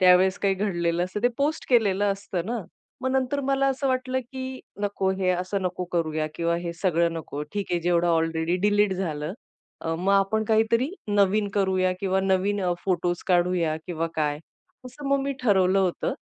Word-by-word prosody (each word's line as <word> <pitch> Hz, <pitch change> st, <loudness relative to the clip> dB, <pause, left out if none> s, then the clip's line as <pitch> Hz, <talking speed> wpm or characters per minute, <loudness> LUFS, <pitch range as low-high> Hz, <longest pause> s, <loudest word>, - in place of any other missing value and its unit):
त्यावेळेस 185 Hz, +1 st, +5 dB
काही 195 Hz, -1 st, +2 dB
घडलेलं 175 Hz, -3 st, 0 dB
असतं, 185 Hz, +3 st, -5 dB
ते 245 Hz, -, +5 dB
पोस्ट 295 Hz, +3 st, -1 dB
केलेलं 205 Hz, -5 st, +3 dB
असतं 195 Hz, -3 st, -4 dB
ना. 230 Hz, -3 st, -2 dB, 0.4 s
मग 260 Hz, -, 0 dB
नंतर 265 Hz, +2 st, 0 dB
मला 275 Hz, 0 st, +1 dB
असं 270 Hz, 0 st, -1 dB
वाटलं, 260 Hz, 0 st, 0 dB
की 260 Hz, +1 st, -7 dB, 0.2 s
नको 200 Hz, -2 st, 0 dB
हे 185 Hz, -1 st, +2 dB
असं 185 Hz, +2 st, -1 dB
नको 180 Hz, 0 st, -2 dB
करूया 155 Hz, -2 st, 0 dB
किंवा 170 Hz, 0 st, 0 dB
हे 170 Hz, 0 st, -4 dB
सगळं 170 Hz, -2 st, +2 dB
नको. 150 Hz, -2 st, -5 dB
ठीक 205 Hz, -1 st, -2 dB
आहे, 175 Hz, -, +1 dB
जेवढं 175 Hz, 0 st, +2 dB
ऑलरेडी 165 Hz, +1 st, +1 dB
डिलीट 205 Hz, -1 st, +3 dB
झालं. 160 Hz, -3 st, -3 dB, 0.5 s
अ, 165 Hz, 0 st, -2 dB
मग 195 Hz, +2 st, +1 dB
आपण 200 Hz, +2 st, +2 dB
काहीतरी 230 Hz, +5 st, +2 dB, 0.2 s
नवीन 205 Hz, 0 st, +3 dB
करूया 185 Hz, -2 st, +2 dB
किंवा 190 Hz, -1 st, +1 dB
नवीन 195 Hz, +1 st, +1 dB, 0.2 s
फोटोज 175 Hz, -2 st, 0 dB
काढूया 175 Hz, -3 st, +2 dB
किंवा 165 Hz, -1 st, -2 dB
काय. 150 Hz, -1 st, 0 dB, 0.5 s
असं 275 Hz, +3 st, -9 dB
मग 275 Hz, 0 st, +3 dB
मी 275 Hz, 0 st, -1 dB
ठरवलं 190 Hz, -4 st, +3 dB
होतं. 185 Hz, -3 st, 0 dB
190 Hz, 175 wpm, -25 LUFS, 175-220 Hz, 0.5 s, त्यावेळेस